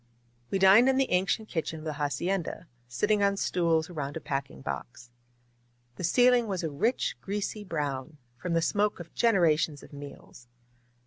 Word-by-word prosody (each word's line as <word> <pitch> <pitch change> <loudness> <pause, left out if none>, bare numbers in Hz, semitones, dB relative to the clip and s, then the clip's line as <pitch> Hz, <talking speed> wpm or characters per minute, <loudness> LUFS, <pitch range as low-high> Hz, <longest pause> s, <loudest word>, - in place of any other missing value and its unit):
We 195 - 0
dined 195 +7 +7
in 265 - +2
the 270 - +1
ancient 190 +4 +1
kitchen 160 -3 -3
of 155 - -10
the 155 - -2
hacienda, 165 +5 -2 0.2
sit 120 +9 -1
ting 210 -1 +2
on 200 0 +2
stools 165 -4 +1
around 145 -4 -5
a - - -4
packing 135 - -4
box. 70 - -7 0.9
The - - -6
ceiling 245 +6 +4
was 190 -4 -2
a 160 - -2
rich, 225 - 0
greasy 205 +1 -3
brown, 150 -4 -4 0.2
from 170 +8 -4
the 165 0 +2
smoke 205 +4 +1
of 165 -1 -10
generations 165 -9 +2
of - - -15
meals. 140 -3 -11
170 Hz, 170 wpm, -28 LUFS, 145-200 Hz, 0.9 s, dined